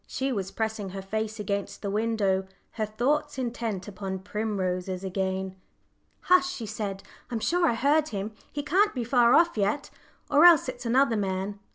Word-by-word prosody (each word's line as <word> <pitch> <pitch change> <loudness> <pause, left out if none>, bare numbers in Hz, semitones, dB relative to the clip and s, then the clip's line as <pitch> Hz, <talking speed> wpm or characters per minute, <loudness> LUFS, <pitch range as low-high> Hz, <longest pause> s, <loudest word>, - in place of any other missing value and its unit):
She 265 +1 -2
was 195 -6 -2
pressing 220 -2 -3
her 195 +1 -6
face 220 +2 -3
against 200 0 -3
the 200 - -2
window, 205 -3 0 0.2
her 215 -2 -2
thoughts 285 +8 0
intent 230 -6 -3
upon 195 -1 -5
primroses 190 -2 -3
again. 190 0 -2 0.7
"Hush!" 360 0 +4
she 240 -11 -6
said; 200 -2 -4 0.3
"I'm 235 - -2
sure 345 +8 +2
I 235 - +2
heard 290 +5 +3
him. 205 -2 -4 0.2
He 290 - -4
can't 380 +7 +2
be 245 - -1
far 240 0 +4
off 340 0 +4
yet, 205 +8 0 0.4
or 295 +2 +5
else 340 -6 +8
it's 250 -1 -5
another 250 -1 +3
man. 195 0 -2
220 Hz, 170 wpm, -27 LUFS, 195-265 Hz, 0.7 s, else